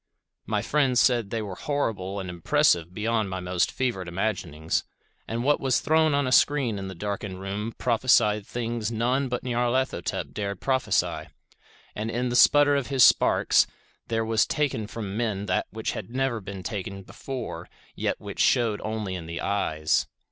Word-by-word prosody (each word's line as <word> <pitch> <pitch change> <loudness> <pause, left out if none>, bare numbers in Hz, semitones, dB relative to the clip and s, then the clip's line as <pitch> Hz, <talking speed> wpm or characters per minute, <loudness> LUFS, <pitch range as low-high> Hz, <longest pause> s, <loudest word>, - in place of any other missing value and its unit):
My 105 -2 0
friend 135 -1 +2
said 120 -5 +3
they 110 0 -2
were 100 -3 -6
horrible 100 -7 -2
and 95 - -5
impressive 90 - +2
beyond 110 +1 -1
my 95 0 -4
most 90 0 0
fevered 115 -9 -2
imaginings; 85 -4 -2 0.4
that 115 - -3
what 145 +4 +2
was 130 -3 +2
thrown 155 -1 +3
on 140 -1 +1
a 130 - -1
screen 130 -6 +3
in 95 - -5
the 95 - -7
darkened 100 0 -4
room 100 +4 -4
prophesied 110 -4 +3
things 115 -2 -3
none 125 +4 0
but 125 -1 -3
Nyarlathotep 125 +1 -1
dared 100 -2 -3
prophesy, 130 -1 0 0.7
and 110 +2 -3
that 115 - -5
in 125 +1 0
the 120 - -2
sputter 145 +3 +6
of 140 -3 -1
his 135 -3 +4
sparks - - +5 0.4
there 115 -1 0
was 110 0 +2
taken 140 -8 -1
from 105 -3 -6
men 105 -4 -1
that 90 -2 0
which 110 +1 -3
had - - -6
never 130 -2 -1
been 95 -1 -7
taken 100 -1 -5
before 130 +4 -7 0.2
yet - - -2
which - - -8
shewed 115 -4 +2
only 110 -3 -3
in 85 -3 -6
the 85 0 -5
eyes. 80 -6 0
110 Hz, 170 wpm, -26 LUFS, 95-125 Hz, 0.7 s, sputter